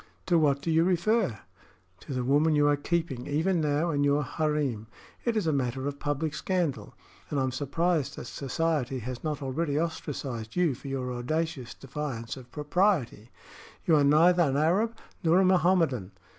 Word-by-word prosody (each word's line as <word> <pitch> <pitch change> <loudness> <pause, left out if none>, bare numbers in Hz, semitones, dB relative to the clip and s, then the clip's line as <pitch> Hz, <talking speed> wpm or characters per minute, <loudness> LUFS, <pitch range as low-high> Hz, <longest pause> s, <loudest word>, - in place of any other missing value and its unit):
"To 175 -2 +3
what 140 -2 +2
do 165 - 0
you 160 +1 +4
refer?" 185 - +1 0.6
"To - - -10
the 125 - -1
woman 150 +4 +3
you 145 0 +4
are 145 - +4
keeping, 145 -4 -2
even 165 +4 +1
now, 150 +3 +1
in 145 -1 +1
your 145 +1 +2
harem. 145 -7 -1 0.4
It 235 -2 +1
is 210 - 0
a 160 - +2
matter 130 0 -1
of 140 0 -4
public 145 +1 -2
scandal, 175 -3 -2 0.3
and 145 - -1
I - - +1
am 130 - 0
surprised 150 +4 0
that - - -7
society 140 -2 -1
has 125 +1 -6
not 150 -2 -3
already 145 +2 -1
ostracized 135 -8 -4
you 175 -5 +2
for 135 - -10
your 130 -2 -3
audacious 135 0 -3
defiance 135 -4 -5
of 125 -2 -13
propriety. 150 - 0 0.6
You 165 - +5
are 145 - +4
neither 165 +5 +5
an 140 -4 +2
Arab 200 +10 +2 0.3
nor 165 +1 +4
a 190 - +4
Mohammedan. 170 - +2
150 Hz, 175 wpm, -28 LUFS, 135-165 Hz, 0.6 s, You